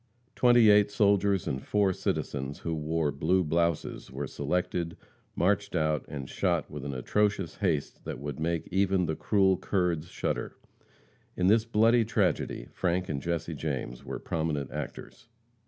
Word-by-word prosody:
Twenty 120 Hz, -3 st, +6 dB
eight 105 Hz, 0 st, +5 dB
soldiers 100 Hz, -2 st, +2 dB
and 65 Hz, -, -2 dB
four 100 Hz, +2 st, +1 dB
citizens 70 Hz, -4 st, -3 dB
who 85 Hz, -, -2 dB
wore 80 Hz, -1 st, 0 dB
blue 90 Hz, +5 st, +1 dB
blouses 85 Hz, 0 st, -1 dB
were 70 Hz, +2 st, -4 dB
selected, 85 Hz, +4 st, -2 dB, 0.4 s
marched 100 Hz, +1 st, +1 dB
out 75 Hz, -4 st, +1 dB
and 70 Hz, -3 st, -6 dB
shot 85 Hz, 0 st, -1 dB
with 75 Hz, -2 st, -6 dB
an 70 Hz, -1 st, -4 dB
atrocious 100 Hz, +5 st, 0 dB
haste 85 Hz, -8 st, -1 dB
that -, -, -4 dB
would 70 Hz, 0 st, -6 dB
make 85 Hz, +1 st, -1 dB
even 95 Hz, -1 st, +2 dB
the 80 Hz, -1 st, -1 dB
cruel 95 Hz, -1 st, +3 dB
Kurds 90 Hz, -5 st, 0 dB
shudder. -, -, -3 dB, 0.8 s
In 90 Hz, -, +1 dB
this 110 Hz, +4 st, +4 dB
bloody 115 Hz, +1 st, +4 dB
tragedy, 95 Hz, -, 0 dB
Frank 90 Hz, 0 st, -1 dB
and 70 Hz, -3 st, -2 dB
Jesse 85 Hz, +1 st, -2 dB
James 65 Hz, -5 st, -4 dB
were -, -, -5 dB
prominent 75 Hz, -4 st, -2 dB
actors. -, -, -7 dB
85 Hz, 150 wpm, -29 LUFS, 75-100 Hz, 0.8 s, Twenty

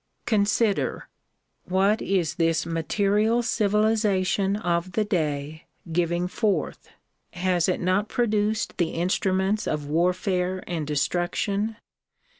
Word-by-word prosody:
Consider; 215 Hz, -1 st, +1 dB, 0.6 s
what 195 Hz, +4 st, +2 dB
is 180 Hz, -5 st, 0 dB
this 165 Hz, 0 st, +2 dB
material 205 Hz, +8 st, +1 dB
civilization 210 Hz, -3 st, +1 dB
of 175 Hz, -3 st, -1 dB
the 215 Hz, +2 st, +1 dB
day 155 Hz, -4 st, -2 dB, 0.2 s
giving 175 Hz, +1 st, 0 dB
forth? 190 Hz, -4 st, -2 dB, 0.4 s
Has 180 Hz, -1 st, +1 dB
it 185 Hz, -, 0 dB
not 185 Hz, +4 st, +1 dB
produced 215 Hz, -2 st, 0 dB
the 175 Hz, -, 0 dB
instruments 190 Hz, +4 st, 0 dB
of 150 Hz, -1 st, -2 dB
warfare 180 Hz, +3 st, 0 dB
and 160 Hz, -4 st, -3 dB
destruction? 175 Hz, +8 st, -1 dB
185 Hz, 100 wpm, -25 LUFS, 170-210 Hz, 0.6 s, what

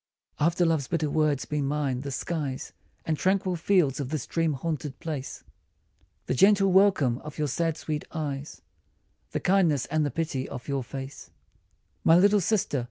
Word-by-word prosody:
AFTER 170 Hz, +3 st, +2 dB
love's 160 Hz, -5 st, +1 dB
bitter 155 Hz, -3 st, -1 dB
words 150 Hz, -3 st, +1 dB
be 150 Hz, -1 st, -2 dB
mine 140 Hz, -2 st, -1 dB
the 140 Hz, -, -5 dB
skies 140 Hz, -1 st, -4 dB, 0.3 s
And 160 Hz, -, 0 dB
tranquil 190 Hz, -1 st, +1 dB
fields 165 Hz, -5 st, +2 dB
of 135 Hz, -3 st, -3 dB
this 155 Hz, -4 st, -3 dB
dream 165 Hz, -2 st, 0 dB
haunted 145 Hz, -1 st, -4 dB
place 150 Hz, -5 st, -5 dB, 0.8 s
The -, -, -1 dB
gentle 195 Hz, +6 st, +5 dB
welcome 185 Hz, -11 st, +4 dB
of 150 Hz, 0 st, -10 dB
your 150 Hz, -1 st, 0 dB
sad, 165 Hz, +3 st, -1 dB
sweet 150 Hz, -2 st, -4 dB
eyes, 145 Hz, -3 st, -5 dB, 0.7 s
The -, -, -2 dB
kindness 175 Hz, -8 st, +2 dB
and 155 Hz, -1 st, 0 dB
the 145 Hz, -, 0 dB
pity 145 Hz, -2 st, -3 dB
of 125 Hz, -3 st, -8 dB
your 140 Hz, -2 st, -1 dB
face: 135 Hz, +2 st, -8 dB, 0.7 s
My 165 Hz, -, +6 dB
little 200 Hz, +2 st, +5 dB
sister 195 Hz, -6 st, +1 dB
155 Hz, 165 wpm, -27 LUFS, 140-170 Hz, 0.8 s, My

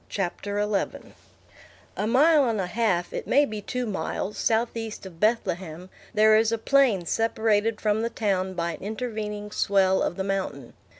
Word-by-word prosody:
CHAPTER 200 Hz, +2 st, -3 dB
XI 210 Hz, -1 st, -2 dB, 0.8 s
A 210 Hz, -, -1 dB
mile 285 Hz, +2 st, +4 dB
and 220 Hz, -2 st, -1 dB
a 190 Hz, -, 0 dB
half, 180 Hz, -3 st, 0 dB
it -, -, -5 dB
may 285 Hz, +3 st, +4 dB
be 215 Hz, -5 st, -6 dB
two 250 Hz, +4 st, -3 dB
miles, 210 Hz, -1 st, -3 dB
southeast 225 Hz, -2 st, -1 dB
of 175 Hz, -3 st, -11 dB
Bethlehem, 185 Hz, -5 st, -1 dB, 0.2 s
there 215 Hz, 0 st, +5 dB
is 220 Hz, +1 st, +3 dB
a 230 Hz, -, +1 dB
plain 230 Hz, -6 st, +3 dB
separated 220 Hz, +1 st, +1 dB
from 215 Hz, 0 st, +1 dB
the 230 Hz, -, -1 dB
town 190 Hz, -5 st, -1 dB
by 170 Hz, -1 st, -1 dB
an -, -, -9 dB
intervening 210 Hz, -1 st, -5 dB
swell 190 Hz, -2 st, +2 dB
of -, -, -1 dB
the 190 Hz, -, -3 dB
mountain. 190 Hz, -10 st, -3 dB
210 Hz, 165 wpm, -25 LUFS, 190-225 Hz, 0.8 s, there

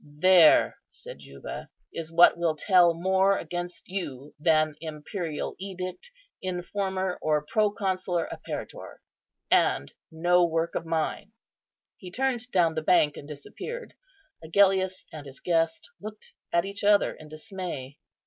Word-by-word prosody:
"There," 160 Hz, +3 st, +5 dB
said -, -, -11 dB
Juba, -, -, -9 dB, 0.2 s
"is 165 Hz, -1 st, -6 dB
what 170 Hz, +1 st, +7 dB
will 170 Hz, -2 st, 0 dB
tell 175 Hz, +1 st, +4 dB
more 190 Hz, +3 st, +2 dB
against 175 Hz, +2 st, -6 dB
you 150 Hz, -7 st, -6 dB
than 155 Hz, -1 st, +3 dB
imperial 160 Hz, +1 st, -5 dB
edict, 185 Hz, -, -6 dB, 0.3 s
informer, 185 Hz, 0 st, -2 dB
or 150 Hz, -1 st, +1 dB
proconsular 195 Hz, -4 st, 0 dB
apparitor; -, -, -7 dB, 0.5 s
and 70 Hz, -, +2 dB, 0.2 s
no 175 Hz, +2 st, +3 dB
work 165 Hz, 0 st, 0 dB
of 165 Hz, -, -4 dB
mine." 165 Hz, +6 st, -2 dB, 0.6 s
He 185 Hz, -, -10 dB
turned 250 Hz, +3 st, -2 dB
down 170 Hz, -7 st, +3 dB
the 160 Hz, -, -2 dB
bank 155 Hz, -3 st, +3 dB
and 145 Hz, -, -10 dB
disappeared. 460 Hz, -, -8 dB, 0.5 s
Agellius 190 Hz, +2 st, +2 dB
and 150 Hz, -2 st, -8 dB
his 135 Hz, 0 st, -11 dB
guest 165 Hz, -2 st, 0 dB
looked 215 Hz, +1 st, -10 dB, 0.2 s
at 170 Hz, +1 st, +2 dB
each 200 Hz, +1 st, -7 dB
other 205 Hz, 0 st, +4 dB
in 155 Hz, -, -14 dB
dismay. 155 Hz, -5 st, -7 dB
175 Hz, 130 wpm, -27 LUFS, 160-190 Hz, 0.6 s, what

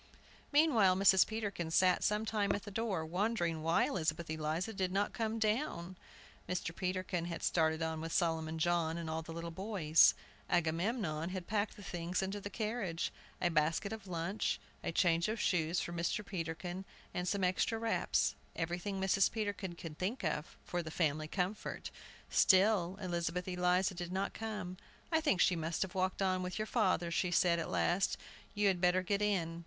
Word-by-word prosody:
Meanwhile, 260 Hz, -, +5 dB
Mrs. 190 Hz, 0 st, +6 dB
Peterkin 205 Hz, -6 st, -3 dB
sat 180 Hz, +2 st, +4 dB
some 210 Hz, +1 st, +1 dB
time 205 Hz, -2 st, +1 dB
at 200 Hz, -, -3 dB
the 205 Hz, -, -8 dB
door, 195 Hz, -6 st, -1 dB
wondering 175 Hz, -2 st, 0 dB
why 165 Hz, +2 st, +3 dB
Elizabeth 160 Hz, -2 st, -1 dB
Eliza 160 Hz, +7 st, -2 dB
did 190 Hz, -2 st, -1 dB
not 200 Hz, +2 st, 0 dB
come 225 Hz, -1 st, -1 dB
down. 215 Hz, -, -1 dB, 0.5 s
Mr. 175 Hz, -2 st, -2 dB
Peterkin 185 Hz, -1 st, -2 dB
had 170 Hz, -1 st, -5 dB
started 160 Hz, -1 st, +2 dB
on 160 Hz, -1 st, -2 dB
with 165 Hz, 0 st, -4 dB
Solomon 160 Hz, -2 st, 0 dB
John 170 Hz, 0 st, +1 dB
and 170 Hz, -1 st, -4 dB
all 160 Hz, 0 st, -2 dB
the 165 Hz, -, -9 dB
little 170 Hz, +1 st, -5 dB
boys. 175 Hz, -4 st, +4 dB, 0.3 s
Agamemnon 170 Hz, 0 st, 0 dB
had 185 Hz, -1 st, -5 dB
packed 205 Hz, +1 st, -1 dB
the 205 Hz, -, -11 dB
things 175 Hz, +1 st, -2 dB
into 195 Hz, +2 st, -3 dB
the 200 Hz, -, -5 dB
carriage, 210 Hz, -5 st, -2 dB, 0.3 s
a 175 Hz, -, +2 dB
basket 165 Hz, +7 st, +1 dB
of 215 Hz, -3 st, -8 dB
lunch, 175 Hz, +3 st, -1 dB, 0.2 s
a -, -, -1 dB
change 170 Hz, 0 st, +3 dB
of 220 Hz, +1 st, -2 dB
shoes 170 Hz, -1 st, +1 dB
for 175 Hz, -, -4 dB
Mr. 175 Hz, +5 st, -1 dB
Peterkin, 175 Hz, 0 st, -4 dB, 0.4 s
some 195 Hz, +2 st, -1 dB
extra 185 Hz, +5 st, +1 dB
wraps, 225 Hz, 0 st, +1 dB, 0.2 s
everything 175 Hz, +4 st, -2 dB
Mrs. 190 Hz, 0 st, +3 dB
Peterkin 205 Hz, -5 st, -3 dB
could 165 Hz, -3 st, -8 dB
think 205 Hz, +7 st, -2 dB
of, 155 Hz, -1 st, -2 dB
for 175 Hz, -, -2 dB
the 160 Hz, -, -6 dB
family 155 Hz, -2 st, 0 dB
comfort. 190 Hz, +5 st, -3 dB, 0.4 s
Still 190 Hz, -2 st, +4 dB
Elizabeth 175 Hz, -1 st, -2 dB
Eliza 180 Hz, +1 st, +2 dB
did 175 Hz, 0 st, -5 dB
not 190 Hz, +2 st, -1 dB
come. 210 Hz, -5 st, -5 dB, 0.3 s
"I 320 Hz, -1 st, +3 dB
think 290 Hz, -, +2 dB
she 180 Hz, -, +4 dB
must 165 Hz, 0 st, -1 dB
have 190 Hz, -, -7 dB
walked 185 Hz, 0 st, 0 dB
on 185 Hz, -1 st, +1 dB
with 180 Hz, 0 st, -4 dB
your 215 Hz, -, -1 dB
father," 185 Hz, -7 st, +1 dB
she 180 Hz, +2 st, +1 dB
said, 175 Hz, -1 st, +3 dB
at 165 Hz, -, -3 dB
last; 185 Hz, +2 st, +1 dB, 0.4 s
"you 205 Hz, 0 st, +1 dB
had 185 Hz, -3 st, +2 dB
better 180 Hz, +1 st, +3 dB
get 200 Hz, +2 st, 0 dB
in." 170 Hz, -5 st, 0 dB
180 Hz, 175 wpm, -34 LUFS, 165-200 Hz, 0.5 s, Mrs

